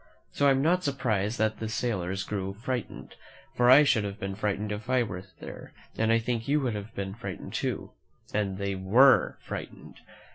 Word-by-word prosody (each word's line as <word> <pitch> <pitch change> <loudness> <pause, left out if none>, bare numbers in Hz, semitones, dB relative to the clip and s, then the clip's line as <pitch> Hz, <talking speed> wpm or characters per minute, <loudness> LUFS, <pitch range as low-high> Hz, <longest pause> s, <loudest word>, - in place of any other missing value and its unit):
So 145 - +2
I - - +7
am 135 0 +3
not 180 +3 +2
surprised 115 - 0
that 110 0 0
the 110 - -3
sailors 95 -5 -2
grew 95 -2 -4
frightened, 120 +1 -5 0.4
for 120 0 +4
I 135 +4 +9
should 125 -7 +3
have 100 0 -5
been 95 0 -3
fright 100 0 -1
ened 105 0 -4
if 105 +3 -5
I 130 -1 +3
were 90 -5 -5 0.2
there, - - -10 0.2
and 110 0 +1
I 115 - +5
think 115 0 -2
you 145 +2 +3
would 125 -4 -1
have 105 +1 -7
been 95 -1 -4
frightened 100 -4 -7
too. - - -3 0.4
And 100 -3 -1
they 100 0 -2
were 115 +8 +5
frightened. - - -8
110 Hz, 195 wpm, -28 LUFS, 100-125 Hz, 0.4 s, I